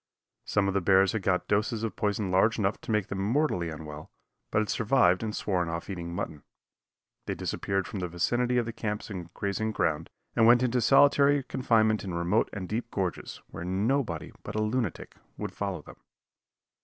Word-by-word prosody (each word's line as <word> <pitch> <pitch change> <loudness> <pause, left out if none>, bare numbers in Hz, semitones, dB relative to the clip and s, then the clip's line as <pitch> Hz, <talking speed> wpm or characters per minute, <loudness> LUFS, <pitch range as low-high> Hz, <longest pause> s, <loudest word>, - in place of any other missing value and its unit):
Some 100 -2 +1
of 95 - 0
the 100 - +1
bears 95 +1 +4
had 110 - -2
got 90 -1 0
doses 110 +2 0
of 115 - -2
poison 105 -2 -1
large 100 +5 +3
enough 100 -1 0
to - - -5
make 105 -3 +2
them 100 - -3
mortally 105 - +1
unwell, 75 -1 -8 0.4
but - - -1
had 110 -1 +1
survived 105 -6 +3
and 110 -2 -3
sworn 90 -4 -1
off 85 +4 -4
eating 85 -2 -5
mutton. 80 -3 -4 0.9
They - - -1
disappeared 95 -1 -2
from 100 - -5
the 90 - -2
vicinity 120 +9 0
of 120 - +2
the 115 - -5
camps 105 -1 -4
and 90 -3 -6
grazing 105 +2 -1
ground, 80 -4 0 0.3
and 115 - +5
went 120 +1 +6
into 125 0 +1
solitary 140 +2 +5
confinement 110 -5 +2
in 90 -3 -4
remote 85 +6 +1
and 95 -3 -5
deep 115 +4 -3
gorges, 95 -5 -4
where 80 - -6
nobody 95 - -1
but 105 - -7
a 110 - +1
lunatic 110 -3 -2 0.2
would - - -4
follow - - -3
them. - - -13
105 Hz, 190 wpm, -28 LUFS, 90-115 Hz, 0.9 s, went